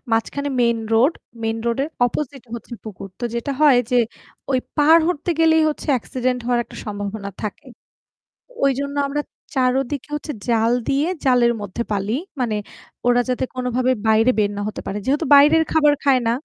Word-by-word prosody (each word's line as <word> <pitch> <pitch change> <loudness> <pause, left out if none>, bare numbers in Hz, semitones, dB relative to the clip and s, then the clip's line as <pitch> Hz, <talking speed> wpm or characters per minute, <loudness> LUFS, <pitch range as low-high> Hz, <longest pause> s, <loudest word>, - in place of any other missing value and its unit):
মাঝখানে 280 +5 0
main 235 -1 +3 0.2
road 250 +8 +4 0.3
main 225 0 -1
road 235 +2 0
এর - - -5 0.2
opposite 275 +1 -5
হচ্ছে 235 +1 -9
পুকুর 195 -2 -8
তো - - -2
যেটা 235 +4 -2
হয় 290 -5 +6
যে 250 - +3 0.5
ওই 260 - +3 0.2
পাড় 315 +3 +6
হতে 350 0 -2
গেলেই 320 -1 +4
হচ্ছে 300 - -5
অ্যাক্সিডেন্ট 250 +1 -2
হওয়ার 240 -1 +2
একটা - - -14
সম্ভাবনা 205 -1 -5
থাকে। 215 +7 -6 1.0
ওইজন্য 280 +1 0
আমরা 295 +1 -2 0.3
৪ 255 -1 +3 0.2
দিকে 290 +1 -5
হচ্ছে 295 +1 -5 0.2
জাল 230 -1 +2 0.2
দিয়ে 280 +4 +1 0.2
জালের 245 -2 +4
মধ্যে 205 +3 -4
পালি 205 +2 -1 0.3
মানে 235 -4 0 0.5
ওরা 245 0 +4
যাতে 250 +1 0
কোনোভাবে 250 0 0 0.2
বাইরে 220 +3 +4
বের 205 -1 +2
না - - -2
হতে 215 - -5
পারে। 195 - -3
যেহেতু 290 +5 +1
বাইরের 305 +3 +6
খাবার 300 -2 +4
খায় 265 -3 +4
না - - +3
250 Hz, 170 wpm, -21 LUFS, 225-285 Hz, 1.0 s, হয়